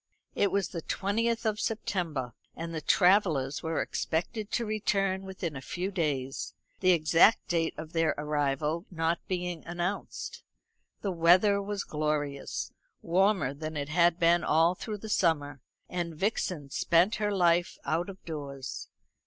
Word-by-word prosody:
It 200 - +2
was 200 -1 0
the 170 - -5
twentieth 225 +7 -1
of 215 -1 0
September, 165 - -2 0.2
and 165 0 -5
the 160 - -3
travellers 160 -7 +3
were 160 0 -1
expected 200 +6 -2
to 235 - +1
return 195 -3 0
within 190 -5 -5
a 135 - -6
few 180 +8 -3
days 140 -7 -2 0.2
the 185 - +3
exact 170 +5 +5
date 165 -2 0
of 155 0 -8
their 165 -1 +2
arrival 150 +3 -1
not 165 -1 0
being 180 -3 -3
announced. 175 +3 -4 0.6
The 200 - 0
weather 180 +4 +5
was 200 0 -3
glorious, 150 -2 -2 0.3
warmer 185 -4 +2
than 155 +2 -5
it 140 0 -3
had 170 +1 +4
been 170 0 +4
all 165 +3 +4
through 210 +3 -5
the 220 - -8
summer; 145 - +1 0.3
and 175 -2 -3
Vixen 175 -6 -2
spent 175 +10 +3
her 210 -1 0
life 175 -2 +2
out 170 +4 0
of 195 -1 -11
doors. 140 -4 -6
170 Hz, 145 wpm, -29 LUFS, 155-195 Hz, 0.6 s, exact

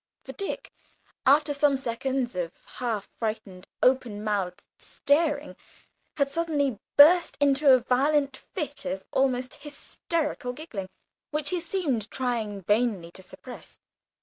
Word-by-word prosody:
For - - -8
Dick, 395 - -5 0.6
after 290 +2 +5
some 285 -1 +3
seconds 260 -1 -2
of 175 -2 -3
half 230 -5 -3
frightened 205 -4 -4 0.2
open 245 -5 +2
mouthed 195 -4 -2
staring, 290 0 0 0.6
had 280 -2 +3
suddenly 285 -6 0 0.2
burst 335 +5 +7
into 280 0 +5
a 260 - +8
violent 275 +3 +2
fit 300 -3 -6
of 190 0 -3
almost 255 -1 +1
hysterical 295 -2 -3
giggling, 235 - -7 0.4
which 300 +1 -1
he 360 - 0
seemed 315 - -1
trying 225 -6 -2
vainly 205 -4 +1
to 190 - -13
suppress. 245 +6 -11
265 Hz, 120 wpm, -27 LUFS, 220-290 Hz, 0.6 s, a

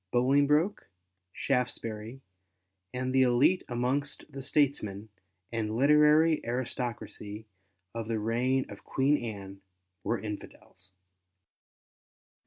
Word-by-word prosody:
Bolingbroke, 145 - +2 0.4
Shaftesbury, 120 -1 -2 0.7
and, 130 +1 -2
the 130 - +5
elite 130 +8 +4
amongst 130 +4 -1
the 135 0 -7
statesmen 110 -8 0 0.4
and 110 -2 -2
literary 150 +3 +5
aristocracy 120 -3 -4 0.5
of 115 -1 -4
the 115 -1 -1
reign 120 +5 +1
of - - -11
Queen 140 +2 +2
Anne 100 -3 -7 0.4
were 120 - 0
Infidels. 100 -3 -9
125 Hz, 90 wpm, -30 LUFS, 110-140 Hz, 0.7 s, the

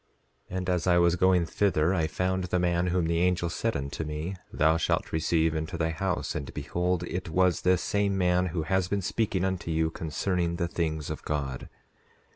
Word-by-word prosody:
And 95 -1 -3
as 90 -1 0
I 90 -1 +5
was 85 0 +4
going 90 -1 +3
thither 85 -2 +1
I 80 -4 +1
found 90 +3 -1
the 90 +1 0
man 90 0 +1
whom 90 -1 +1
the 85 0 +1
angel 90 -1 +1
said 115 +5 -1
unto 70 +3 -4
me: 75 +5 -4 0.2
Thou 80 +2 +3
shalt - - 0
receive 80 0 +1
into 80 +1 -3
thy 80 0 0
house—and 80 -4 -2
behold 90 0 -1
it 90 0 -4
was 90 0 +2
this 90 -1 +2
same 100 -1 +1
man 90 0 +2
who 80 -2 -2
has 95 +3 +1
been 100 0 -1
speaking 95 -2 0
unto 95 -3 -2
you 80 0 +1
concerning 85 +2 -1
the 85 -1 -1
things 80 -3 -2
of - - -5
God. 70 -4 -3
85 Hz, 190 wpm, -28 LUFS, 80-90 Hz, 0.2 s, I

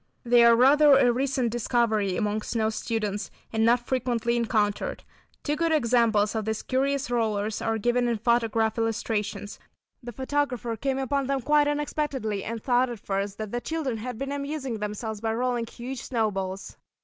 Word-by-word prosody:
They 240 -1 +5
are 235 0 +7
rather 285 +4 +6
a 245 -3 +4
recent 255 -2 0
discovery 220 -5 +1
among 210 -1 -1
snow 220 0 -1
students, 215 -2 -3 0.2
and 220 0 +1
not 240 +1 +3
frequently 240 -2 0
encountered. 215 -3 0 0.4
Two 295 - 0
good 330 +1 0
examples 235 -7 +3
of 220 -2 -2
these 220 0 -2
curious 275 +1 0
rollers 215 -3 -1
are 225 0 0
given 240 +3 +1
in 235 -1 0
photograph 230 -1 +1
illustrations. 210 -2 -2 0.4
The 240 -1 -7
photographer 260 -2 -2
came 265 +4 -2
upon 270 0 -1
them 275 -1 0
quite 295 +3 +3
unexpectedly 290 -8 -2
and 230 -1 -5
thought 250 0 +2
at 235 -3 -6
first 195 0 -3
that 215 -2 -5
the 240 - -2
children 275 -3 -2
had 245 +1 -5
been 275 +2 -4
amusing 280 -4 -4
themselves 210 +1 -4
by 225 -1 -1
rolling 240 -1 -1
huge 245 +2 -7
snowballs. 195 -5 -3
235 Hz, 165 wpm, -26 LUFS, 220-260 Hz, 0.4 s, are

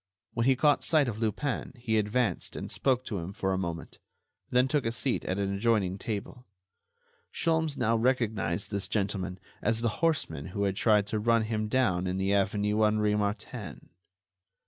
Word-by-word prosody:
When 115 +1 +1
he 135 - +5
caught 145 +3 +3
sight 155 -4 +4
of 110 -2 -3
Lupin 120 +6 -2
he 115 -3 0
advanced 110 +3 -1
and - - -5
spoke 130 -2 +1
to 100 - -3
him 85 +3 -6
for 95 -1 -1
a - - 0
moment, 85 -3 -5 0.5
then 125 +1 +3
took 145 0 +1
a 115 - 0
seat 125 +2 -1
at 95 - -1
an 100 -1 -1
adjoining 100 -3 +1
table. 115 +4 -5 0.8
Sholmes 160 -3 0
now 115 +1 +2
recognized 110 -7 0
this 100 -2 -1
gentleman 95 -3 -2 0.2
as 115 -1 +1
the 115 - +2
horseman 135 - 0
who 100 +3 -3
had 100 -1 0
tried 105 -1 +3
to 105 +1 -2
run 115 +1 +3
him 110 -1 -2
down 95 -7 +1
in 90 +1 -1
the 95 +1 +1
avenue 105 +2 +1
Henri 105 0 +2
Martin. 105 - -4
110 Hz, 175 wpm, -29 LUFS, 100-120 Hz, 0.8 s, he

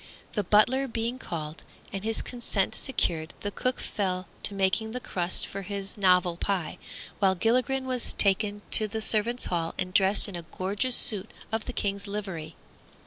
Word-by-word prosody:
The 210 - 0
butler 255 +7 +4
being 235 +1 -2
called, 155 -5 -5 0.3
and 195 0 -4
his 225 0 -1
consent 235 -5 -1
secured, 165 - -1
the 205 - -2
cook 255 +4 -1
fell 185 -3 -2
to 200 - +4
making 195 +3 +1
the 250 - -2
crusts 180 -6 -1
for 195 - -5
his 200 0 -5
novel 180 -3 +3
pie, 185 -3 -2 0.4
while 190 -2 +4
Gilligren 255 +6 +2
was 255 -2 -2
taken 205 +1 +3
to 215 - +7
the 220 +2 -4
servants' 225 +3 +2
hall 165 -2 -1
and 185 -1 -2
dressed 195 +2 +3
in 200 - -7
a 175 - -4 0.2
gorgeous 205 +7 0
suit 210 -1 +1 0.2
of 220 0 -1
the 250 - -5
King's 200 -2 -2
livery. 190 -6 -5
200 Hz, 170 wpm, -28 LUFS, 185-225 Hz, 0.4 s, to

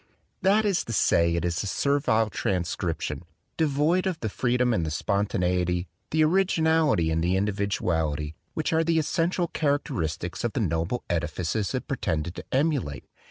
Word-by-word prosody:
That 205 +3 +4
is 200 -4 +1
to 115 - -4
say, 85 -4 +3
it 85 0 -1
is 85 -1 -1
a 105 - -4
servile 115 -4 +1
transcription, 85 -4 -2 0.3
de 160 - +2
void 155 +7 +2
of 180 -4 -2
the 110 - -2
freedom 125 +2 +1
and 85 - +1
the 80 - -2
spontaneity, 90 -1 0 0.2
the 155 0 +3
originality 160 - +3
and 80 +1 0
the 90 +2 +2
individuality, 85 -7 -1 0.2
which 155 +1 -1
are 160 0 +3
the 165 0 +1
essential 170 +3 +1
characteristics 90 - -2
of 120 - -1
the - - -1
noble 85 +3 -1
edifices 85 +5 -1
it - - -4
pretended 80 +2 -2
to - - -7
emulate. 135 - 0
105 Hz, 160 wpm, -26 LUFS, -, 0.3 s, That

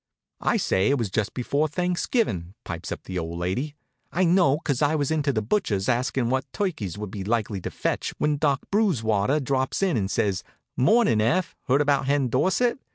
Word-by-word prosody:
"I - - +1
say 95 +2 +2
it 140 - +3
was 115 -6 -2
just 105 0 -1
before 140 +5 0
Thanksgivin'," 170 - -1
pipes 85 -1 -6
up - - -5
the 90 -1 -4
old 85 0 -4
lady. 110 - -2 0.4
"I 185 - +1
know, 170 -5 +4
'cause 145 -4 -2
I 150 +1 +3
was 145 -1 0
into 150 -2 +1
the 110 -4 -1
butcher's 105 - 0
askin' 125 0 0
what 130 +1 -1
turkeys 135 - -3
would 105 -2 -6
be 100 -2 -5
likely 105 -2 -1
to - - -4
fetch, - - -2
when 150 -1 +1
Doc 140 -2 +1
Brewswater 135 - +2
drops 130 +4 -1
in 185 -9 +2
and 95 -3 -1
says: 95 -3 0 0.3
'Mornin', 205 - +4
Eph. 170 +10 +1
Heard 135 +3 +4
about 140 -2 +2
Hen 140 -2 +2
Dorsett?' 190 - +1
130 Hz, 190 wpm, -25 LUFS, 105-155 Hz, 0.4 s, know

